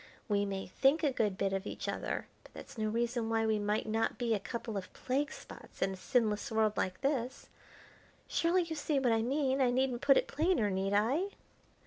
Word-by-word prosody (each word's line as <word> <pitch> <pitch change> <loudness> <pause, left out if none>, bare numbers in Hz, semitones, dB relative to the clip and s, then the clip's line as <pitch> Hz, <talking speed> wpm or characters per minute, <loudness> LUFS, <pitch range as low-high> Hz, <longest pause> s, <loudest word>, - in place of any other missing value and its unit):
We 205 -2 +2
may 195 -1 -3
think 275 - +2
a 290 - +3
good 210 -6 0
bit 195 -1 0
of 195 +1 -2
each - - -5
other, - - -2 0.2
but - - -18
that's - - -10
no 215 -2 -1
reason 235 0 -1
why 225 0 +1
we 220 -1 +2
might 210 +1 0
not 225 +1 0
be 235 -2 0
a 210 - +1
couple 230 +1 -5
of 190 -2 -5
plague 280 +4 -1
spots - - -12
in 190 - +1
a - - -5
sinless 215 +2 0
world 220 -1 +2
like 185 0 -2
this. 265 -2 -1 0.8
Surely 350 +2 +2
you 330 -1 -5
see 295 -1 0
what 260 -3 +2
I 225 0 +3
mean, 270 +2 +1
I 255 - +4
needn't 255 0 +1
put 275 -1 +6
it - - +3
plainer, 290 - +1
need 190 +1 -1
I?" 250 - +2
230 Hz, 210 wpm, -33 LUFS, 210-270 Hz, 0.8 s, put